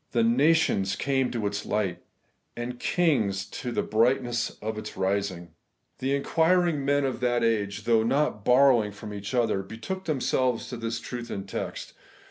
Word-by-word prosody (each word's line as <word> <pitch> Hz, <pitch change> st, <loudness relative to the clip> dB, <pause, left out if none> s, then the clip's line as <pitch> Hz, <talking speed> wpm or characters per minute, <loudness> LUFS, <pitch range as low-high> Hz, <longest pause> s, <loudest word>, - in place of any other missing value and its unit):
'The 115 Hz, -, +3 dB
nations 120 Hz, -6 st, +3 dB
came 135 Hz, -2 st, 0 dB
to 115 Hz, -4 st, -3 dB
its 100 Hz, 0 st, -2 dB
light, 95 Hz, -5 st, -1 dB, 0.6 s
and 120 Hz, +1 st, -5 dB
kings 110 Hz, -, +1 dB
to 125 Hz, -, -6 dB
the -, -, 0 dB
brightness 120 Hz, +1 st, +1 dB
of 110 Hz, +1 st, -4 dB
its -, -, -8 dB
rising.' 95 Hz, -3 st, -2 dB, 0.5 s
The 135 Hz, +2 st, 0 dB
inquiring 165 Hz, +1 st, +2 dB
men 145 Hz, 0 st, +2 dB
of 130 Hz, -2 st, -2 dB
that 120 Hz, -1 st, +1 dB
age, 105 Hz, -3 st, 0 dB
though 115 Hz, 0 st, +3 dB
not 115 Hz, -2 st, 0 dB
bor 135 Hz, +5 st, +6 dB
rowing 110 Hz, -5 st, +2 dB
from 105 Hz, +1 st, -8 dB
each 100 Hz, +4 st, -5 dB
other, 115 Hz, -5 st, +2 dB
betook 115 Hz, -, -6 dB
themselves 130 Hz, -5 st, 0 dB
to 125 Hz, -, -5 dB
this 115 Hz, 0 st, -3 dB
truth 120 Hz, -1 st, -6 dB
and 95 Hz, 0 st, -5 dB
text. -, -, -5 dB
115 Hz, 165 wpm, -27 LUFS, 105-135 Hz, 0.6 s, bor